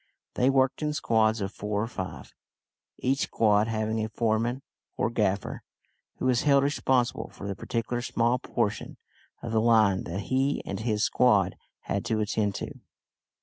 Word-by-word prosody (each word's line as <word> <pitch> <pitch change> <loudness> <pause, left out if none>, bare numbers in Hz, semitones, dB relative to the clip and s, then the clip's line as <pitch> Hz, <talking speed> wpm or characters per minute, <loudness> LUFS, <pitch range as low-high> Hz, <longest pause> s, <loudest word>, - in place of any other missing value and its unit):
They 125 - +2
worked 135 0 +2
in 150 0 0
squads 110 -5 +2
of 95 0 -2
four 105 0 -3
or 105 - 0
five 95 -5 -7 0.6
each 135 +2 0
squad 105 -4 +2
having 110 0 -1
a 110 - -3
foreman 115 +4 0 0.3
or 115 - 0
gaffer, 100 -4 -1 0.5
who - - -4
was 125 -2 +3
held 140 -2 +4
responsible 130 -3 0
for 100 - -9
the 100 - -3
particular 120 +3 -3
small 120 0 +1
portion - - -2 0.5
of 115 - -4
the 110 -1 +2
line 110 -4 +4
that 90 +4 -4
he 130 +8 0
and - - -4
his 110 -1 0
squad 110 -4 +3 0.3
had 100 - -2
to 110 -2 0
attend 105 -1 0
to. - - -6
115 Hz, 160 wpm, -27 LUFS, 105-125 Hz, 0.6 s, held